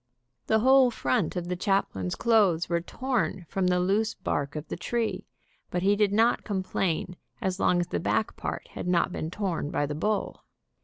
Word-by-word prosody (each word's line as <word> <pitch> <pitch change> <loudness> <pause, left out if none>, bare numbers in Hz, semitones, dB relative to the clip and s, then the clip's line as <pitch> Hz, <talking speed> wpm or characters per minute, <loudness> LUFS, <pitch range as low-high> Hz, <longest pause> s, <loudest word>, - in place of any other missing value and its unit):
The 220 0 +3
whole 260 +1 +6
front 135 - 0
of 175 -1 -3
the 180 - -1
chaplain's 175 - 0
clothes 200 -8 +3
were 170 0 0
torn 225 -4 -2
from 190 -2 0
the 180 0 +2
loose 200 +5 +1
bark 145 -6 -2
of 150 +1 -5
the - - -4
tree, 230 +5 -2 0.4
but 180 - -2
he 200 +1 +4
did 205 -1 +2
not 225 +3 +3
complain 185 -3 -2 0.2
as 190 -4 -2
long 180 - +3
as 175 - +1
the - - -1
back 220 - 0
part - - -5
had - - -6
not 180 +1 +2
been 160 - -4
torn 180 -5 -2
by 145 - 0
the 145 - -4
bull. 205 +7 -2
185 Hz, 190 wpm, -27 LUFS, 170-215 Hz, 0.4 s, whole